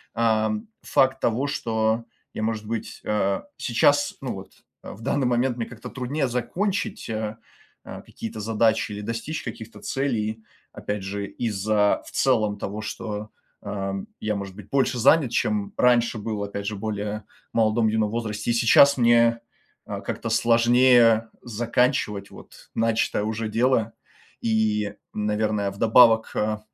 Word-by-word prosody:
ам, 115 - +1
факт 130 0 +2
того, 120 +3 0
что 115 -5 0 0.3
я, - - -5
может 110 -1 -2
быть, 115 +1 -5
э, 100 -2 0 0.2
сейчас, 145 +4 +2
ну, 130 - -3
вот, 95 0 -10 0.3
а, - - -9
в 105 - -14
данный 135 +2 0
момент 125 +1 +1
мне 115 - -3
как-то 120 -1 -9
труднее 135 +2 -2
закончить, 190 - -2
а, 110 0 -3 0.5
а, - - -9
какие-то 110 -1 -8
задачи 110 0 +1
или 105 - -5
достичь 115 +9 -4
каких-то 115 -1 -8
целей. 110 -5 -2 0.3
Опять 105 0 -4
же, 100 +1 -4
из-за 105 -2 0
в - - -12
целом 110 -6 +2
того, 105 +2 -4
что, 110 0 -5 0.3
а, 100 -1 -3 0.2
я, 105 -1 -1
может 100 -1 -6
быть, 105 -3 -12
больше 130 -3 +1
занят, 135 0 +4
чем 105 -3 0
раньше 120 -2 +3
был, 105 -1 -3
опять 100 0 -5
же, 110 - -2
более 105 0 -4 0.3
в - - -5
молодом, 110 0 +3
юном 110 -1 +1
возрасте. 110 -1 -2
И - - +2
сейчас 125 +4 +6
мне, 115 -1 +4 0.5
а, - - -5
как-то - - -4
сложнее 120 -1 +4
заканчивать, 115 -3 0
вот, - - -15
начатое 115 -2 +1
уже 110 0 -2
дело. 115 -1 +1 0.5
И, 105 -2 +1 0.2
наверное, 105 -1 0
вдобавок, 110 +2 +5
э, 105 0 0
110 Hz, 145 wpm, -24 LUFS, 105-120 Hz, 0.5 s, сейчас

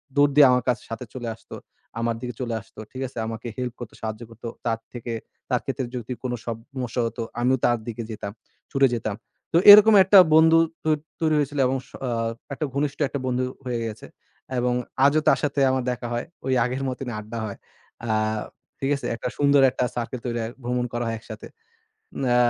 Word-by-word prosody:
দৌড় 145 0 +5
দিয়ে 145 -2 +9
আমার 125 -1 +2
কাছে 120 - 0
সাথে 115 +2 -5
চলে 120 -2 -5
আসতো - - -12 0.4
আমার 115 0 0
দিকে 125 -1 -4
চলে 120 -2 -2
আসতো। 105 - -17
ঠিক 130 - -7
আছে? 125 - -15
আমাকে 115 +1 -6
হেল্প 125 -2 -3
করতো, 120 -2 -8
সাহায্য 110 0 -4
করতো। 115 +1 -9 0.2
তার 115 -1 0
থেকে 120 -1 -5 0.4
তার - - +1
ক্ষেত্রে 130 -2 -2
যদি 125 0 -4
কোন 125 - -2
সমস্যা 120 +1 -4
হতো, 115 - -6 0.2
আমিও 130 +2 +3
তার 120 - +3
দিকে 115 0 -4
যেতাম 100 -2 -5 0.4
ছুটে 135 -1 +4
যেতাম। 110 -3 -3 0.4
তো - - +6
এরকম 210 +1 +10
একটা 195 +2 +6 0.2
বন্ধু 160 +1 +7 0.3
তৈ 155 0 +3 0.3
তৈরি 155 -2 +2
হয়েছিল 145 0 -1
এবং 135 - 0
স - - -21 0.2
আ - - -1 0.4
একটা 150 - -2
ঘনিষ্ঠ 140 0 -1
একটা 140 - -4
বন্ধু 125 0 0 0.2
হয়ে 120 -2 -2
গেছে। 105 - -8 0.5
এবং 125 0 +1 0.3
আজও 150 +2 +4
তার - - +5
সাথে 145 -1 0
আমার 130 -1 0
দেখা 120 -1 -4
হয়, 120 - -2 0.2
ঐ - - -3 0.2
আগের 130 +2 -3
মতনই 125 -1 -5
আড্ডা 110 +2 -7
হয়। 100 - -6 0.5
আ - - -4 0.7
ঠিক 135 - -1
আছে? 140 - -7
একটা 115 - -4
সুন্দর 140 -1 +5
একটা 125 - -1
সার্কেল 120 +1 -3
তৈরি 120 -1 -2
হয়, 115 - -4
ভ্রমণ 125 0 -1
করা 120 0 -1
হয় 115 - -1
একসাথে। 110 -1 -10 0.8
না 120 -1 +2
125 Hz, 195 wpm, -24 LUFS, 115-135 Hz, 0.8 s, এরকম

